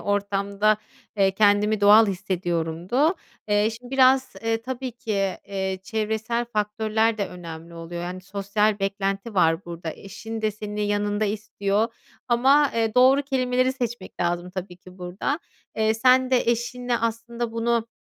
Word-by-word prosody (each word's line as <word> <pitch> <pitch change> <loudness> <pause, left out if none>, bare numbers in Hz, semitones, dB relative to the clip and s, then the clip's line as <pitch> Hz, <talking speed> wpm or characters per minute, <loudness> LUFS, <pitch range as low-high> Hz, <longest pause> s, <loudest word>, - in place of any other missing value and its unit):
ortamda, 200 +1 +1 0.4
eee, 195 -1 +4
kendimi 210 0 +3
doğal 210 +2 +7
hissediyorumdu. 180 - 0 0.3
Eee, 210 +1 +3
şimdi 245 +2 -10
biraz, 265 0 +4
ııı, 225 0 0
tabii 255 0 -4
ki, 200 -4 -2
ııı, 190 -1 -2
çevresel 220 +3 -2
faktörler 220 0 0
de 200 - 0
önemli 170 -1 -9
oluyor. 170 +1 -6
Yani, 180 +1 -5
sosyal 200 +2 0
beklenti 195 +2 -2
var 165 0 +3
burada. 170 -1 -6
Eşin 220 +3 -8
de 215 - +2
seni 210 0 -4
yanında 205 +1 0
istiyor 205 +1 -1 0.4
ama, 270 +4 +4
ııı, 225 -1 +1
doğru 260 +3 +6
kelimeleri 255 -1 +1
seçmek 240 -6 -5
lazım 175 +1 -1
tabii 185 -1 -6
ki 185 +1 -16
burada. 180 - -2 0.4
Eee, 220 0 +2
sen 255 +2 +4
de 255 - +4
eşinle 240 +1 -1
aslında 230 +1 -3
bunu 230 0 0
210 Hz, 140 wpm, -24 LUFS, 195-235 Hz, 0.4 s, doğal